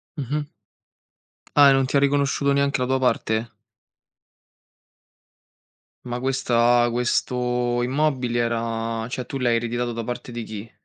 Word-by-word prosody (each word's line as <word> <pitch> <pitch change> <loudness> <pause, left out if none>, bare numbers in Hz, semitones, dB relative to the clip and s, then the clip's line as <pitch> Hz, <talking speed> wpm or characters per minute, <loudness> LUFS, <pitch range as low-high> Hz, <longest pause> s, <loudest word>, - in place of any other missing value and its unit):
Mh-mh. 145 +1 -3 1.1
Ah, 145 -1 +7
e - - +6
non 135 -1 +2
ti 140 - +1
ha - - +5
riconosciuto 140 0 +1
neanche 140 -1 +1
la 125 - +1
tua 130 0 +1
parte? 115 -3 0 2.5
Ma 120 0 -4
questa 120 -2 +2
questo 125 0 0
immobile 130 -3 0
era, 115 -1 -2
cioè, 125 -1 -4
tu 135 - -5
l'hai 120 -2 +2
ereditato 120 +1 -2
da 115 0 -4
parte 120 +1 -6
di 120 -1 -5
chi? 110 +1 -8
125 Hz, 135 wpm, -23 LUFS, 115-135 Hz, 2.5 s, Ah